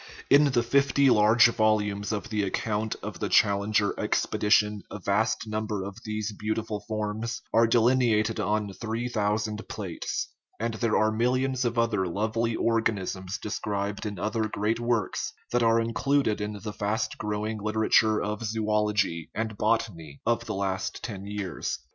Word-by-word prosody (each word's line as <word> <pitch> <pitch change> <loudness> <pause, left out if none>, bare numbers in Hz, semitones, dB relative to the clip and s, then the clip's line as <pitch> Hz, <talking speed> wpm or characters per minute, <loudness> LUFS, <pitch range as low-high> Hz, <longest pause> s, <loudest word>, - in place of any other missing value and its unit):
In 145 +2 +7
the 125 -4 +2
fifty 140 +2 +3
large 105 +1 +6
volumes 105 -2 +1
of 105 0 -3
the 105 -2 0
account 105 +2 -1
of - - -6
the - - -2
Challenger 100 +1 +3
expe - - 0
dition 105 0 +3
a - - -6
vast 105 +4 0
number 110 -2 -3
of 100 0 -6
these 110 0 -3
beautiful 105 0 -3
forms 110 +2 -3
are 115 +1 +5
delineated 115 -2 +3
on 105 -1 -1
three 115 +3 -3
thousand 105 -1 -1
plates; 95 -6 -4 0.3
and 115 +1 -1
there 110 -1 +1
are 110 0 +3
millions 130 +3 +1
of 120 0 -1
other 110 -5 +1
lovely 110 +5 -1
organisms 100 -4 -1
described 105 0 -3
in 100 -2 -5
other 110 +3 -1
great 105 +3 -1
works 120 -4 -1 0.2
that 120 - +2
are 115 0 +4
included 115 0 +1
in 105 0 -3
the 105 -2 -4
fast 105 +2 -2
growing 105 +1 -3
liter 110 +1 -1
ature 110 0 +4
of 105 +2 -3
zoology 105 -5 0
and 110 -1 -2
botany 105 -10 -1
of 115 0 +1
the 110 - -3
last 95 -1 -2
ten 100 -4 -6
years. 100 -4 -3
110 Hz, 155 wpm, -27 LUFS, 105-115 Hz, 0.3 s, In